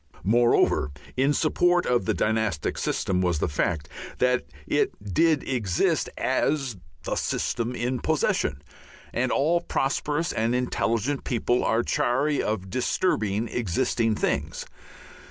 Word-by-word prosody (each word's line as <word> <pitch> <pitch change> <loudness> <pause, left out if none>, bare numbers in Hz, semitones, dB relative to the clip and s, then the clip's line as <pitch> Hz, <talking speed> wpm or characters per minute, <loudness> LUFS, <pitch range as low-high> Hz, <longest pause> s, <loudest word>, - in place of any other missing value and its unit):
Moreover 120 -5 +3 0.3
in 135 +3 +3
support 175 +4 +2
of 120 -5 +1
the - - 0
dynastic 110 -8 0
system 90 -1 0
was 90 -3 +1
the - - 0
fact 75 0 -1 0.3
that 125 0 +1 0.2
it - - +1 0.2
did 160 - +3
exist 110 -9 +1
as 135 -7 0 0.3
the - - -2
system 120 +1 -1
in 125 +2 -1
possession, - - 0 0.5
and 125 +1 0
all 165 +5 +2
prosperous 150 +2 -1
and 115 +2 0
intelligent 125 +1 0
people 120 0 0
are 115 +1 +2
chary 140 +6 +1
of 95 -3 -3
disturbing 110 - 0
existing 115 +1 0
things. - - -2
120 Hz, 120 wpm, -26 LUFS, 110-135 Hz, 0.5 s, Moreover